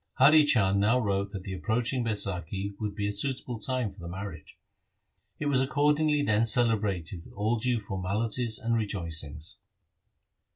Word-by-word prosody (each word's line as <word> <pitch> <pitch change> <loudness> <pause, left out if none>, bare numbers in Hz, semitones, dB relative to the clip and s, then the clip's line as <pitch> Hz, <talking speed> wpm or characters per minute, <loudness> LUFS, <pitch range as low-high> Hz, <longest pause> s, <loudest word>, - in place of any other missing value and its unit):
Hari 150 +3 +6
Chand 100 -7 +3
now 110 +5 +3
wrote 100 -4 -1
that 100 -2 -7
the 95 - -6
approaching 115 - -1
Baisakhi 100 -2 -2
would 105 -2 -4
be 100 -1 -2
a 105 - -2
suitable 125 +1 -2
time 125 -1 0
for 95 - -18
the 85 - -8
marriage. 90 -3 -8 0.8
It 155 - -4
was 140 -3 +3
accordingly 150 +2 +2
then 110 -1 +2
celebrated 105 -7 +1
with - - -16
all 110 +4 0
due 120 0 0
formalities 110 +4 -2
and 115 +1 -2
rejoicings. 80 -8 -1
105 Hz, 155 wpm, -28 LUFS, 95-125 Hz, 0.8 s, Hari